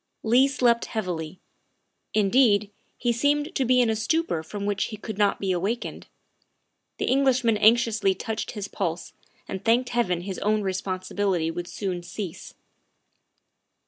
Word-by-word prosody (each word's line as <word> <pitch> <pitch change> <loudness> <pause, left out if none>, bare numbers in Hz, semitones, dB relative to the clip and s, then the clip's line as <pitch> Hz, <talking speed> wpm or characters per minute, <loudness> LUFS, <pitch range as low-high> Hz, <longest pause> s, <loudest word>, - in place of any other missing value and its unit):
Leigh 245 +4 +5
slept 245 -3 +2
heavily. 180 -6 -4 0.8
Indeed, 210 -1 +3 0.3
he 240 - +1
seemed 290 +6 +1
to 270 - 0
be 250 +1 +4
in 240 - +3
a - - 0
stupor 220 - 0
from 200 +5 -6
which 205 -1 0
he 215 - -7
could 215 0 -7
not 205 -1 +2
be 195 -1 -1
awakened. 195 +7 -3 0.9
The - - -1
Eng 275 +2 +3
lishman 250 -4 +3
anxiously 220 -3 +4
touched 220 +3 -4
his 205 -3 -5
pulse 170 -3 -4 0.3
and 190 - -5
thanked 240 +2 +2
Heaven 185 -8 0
his 190 +1 -5
own 215 0 +1
responsibility 185 -2 -1
would 175 +1 -5
soon 185 -1 -4
cease. 175 0 -7
210 Hz, 145 wpm, -25 LUFS, 185-235 Hz, 0.9 s, Leigh